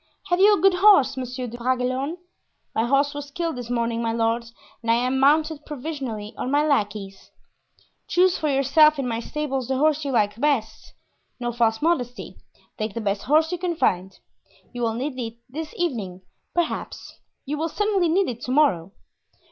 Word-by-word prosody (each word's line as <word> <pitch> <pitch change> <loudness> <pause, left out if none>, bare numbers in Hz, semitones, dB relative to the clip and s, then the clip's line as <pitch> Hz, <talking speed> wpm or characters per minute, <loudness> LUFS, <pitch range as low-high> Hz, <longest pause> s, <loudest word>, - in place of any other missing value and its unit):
"Have 355 0 +2
you 410 +2 +7
a - - -3
good 390 +2 +5
horse, 360 -9 +5
Monsieur 255 0 -4
de 240 0 -8
Bragelonne?" 255 +5 -1 0.6
"My 225 - +1
horse 280 +3 +2
was 290 0 -7
killed 330 +1 -3
this 245 -2 -7
morning, 235 -1 -1
my 230 -1 0
lord, 230 +1 0 0.4
and 230 - -5
I 230 - +5
am 255 +2 0
mounted 305 +2 +3
provisionally 265 -8 -5
on - - -2
my 290 +2 +2
lackey's." 205 -8 -2 0.8
"Choose 365 +1 +3
for 305 - -1
yourself 290 +3 +4
in 270 -2 -2
my 230 -1 -2
stables 270 -1 -3
the 265 - 0
horse 305 +1 +2
you 280 - -2
like 210 -3 +1
best. 225 -7 -1 0.4
No 240 -1 -2
false 230 +1 +1
modesty; 250 -7 -1 0.4
take 215 0 -3
the - - -2
best 200 -2 -1
horse 310 +4 +3
you 360 - -3
can 350 -1 -2
find. 190 - 0 0.6
You 245 - -5
will 225 -1 0
need 260 +2 -4
it 230 -1 -5
this 305 +4 -6
evening, 210 - -3 0.3
perhaps; 345 -2 -3 0.3
you 295 +2 -3
will 325 +1 -1
certainly 400 -1 +1
need 380 +4 +2
it 240 -1 -5
to 250 - -3
morrow." 195 - +2
265 Hz, 180 wpm, -24 LUFS, 230-310 Hz, 0.8 s, you